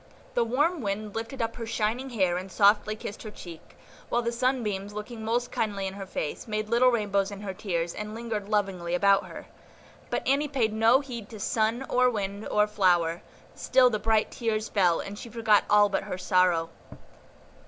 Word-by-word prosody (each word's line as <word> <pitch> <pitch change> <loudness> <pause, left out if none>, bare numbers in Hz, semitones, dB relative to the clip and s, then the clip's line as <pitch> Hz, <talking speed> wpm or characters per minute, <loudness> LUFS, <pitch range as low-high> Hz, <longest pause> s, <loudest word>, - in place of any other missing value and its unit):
The 240 - +2
warm 290 +8 +1
wind 205 0 -3
lifted 230 +3 -3
up 225 0 -4
her 230 -2 -5
shining 230 +4 -1
hair 190 -7 +1
and 185 +1 -5
softly 210 +1 +3
kissed 205 -1 -7
her 215 - -7
cheek, 170 -5 -12 0.3
while 240 - +1
the 235 - -1
sunbeams, 230 -5 -1
looking 220 +2 -7
most 240 +2 -1
kindly 200 -3 -2
in 190 - -4
her 195 -1 -7
face, 155 0 -4
made 215 0 -3
little 240 +2 +5
rainbows 200 -4 0
in 200 -1 -8
her 195 -2 -5
tears, 175 -4 -2
and 210 +1 -6
lingered 220 -3 -4
lovingly 190 -5 0
about 195 +1 +3
her. 170 - -9 0.6
But - - -2
Annie 280 +2 +2
paid 245 -7 0
no 225 +5 +4
heed 235 -6 -8
to 220 - -9
sun, 225 +5 0
or 250 0 +3
wind, 200 -2 -4
or 210 0 +3
flower; 175 -5 +2 0.3
still 255 -1 +3
the 215 - -1
bright 220 -1 +1
tears 220 -2 -2
fell, 180 -5 +3
and 205 +1 -8
she 235 - -8
forgot 220 -2 +3
all 205 0 +6
but 195 - -2
her - - -4
sorrow. 180 -3 +2
215 Hz, 190 wpm, -27 LUFS, 195-235 Hz, 0.6 s, all